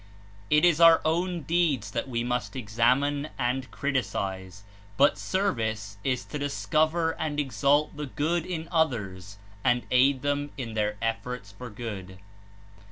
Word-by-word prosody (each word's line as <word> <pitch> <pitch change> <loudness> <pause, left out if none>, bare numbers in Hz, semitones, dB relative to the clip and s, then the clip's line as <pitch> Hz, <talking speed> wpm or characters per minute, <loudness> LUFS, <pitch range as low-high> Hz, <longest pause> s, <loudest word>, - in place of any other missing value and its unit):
It 150 +2 +5
is 170 -2 +4
our 165 -1 +8
own 170 +1 0
deeds 150 -9 +1
that 120 +5 -3
we 120 -2 -1
must 120 -4 -2
examine 130 +6 +1
and 130 0 -1
criticise, 100 -8 -3 0.3
but 140 - +5
service 110 - -1
is 130 -2 -1
to 150 - -6
discover 155 +3 +1
and 150 -2 -2
exalt 145 +2 +1
the 150 0 -5
good 160 +5 -1
in 165 -2 -5
others 100 - -1 0.3
and 120 0 +2
aid 130 +1 +4
them 145 0 -1
in 120 -4 -5
their 105 -1 -1
efforts 115 -1 -3
for 120 +5 -9
good. 105 -5 -7
130 Hz, 140 wpm, -27 LUFS, 110-150 Hz, 0.3 s, our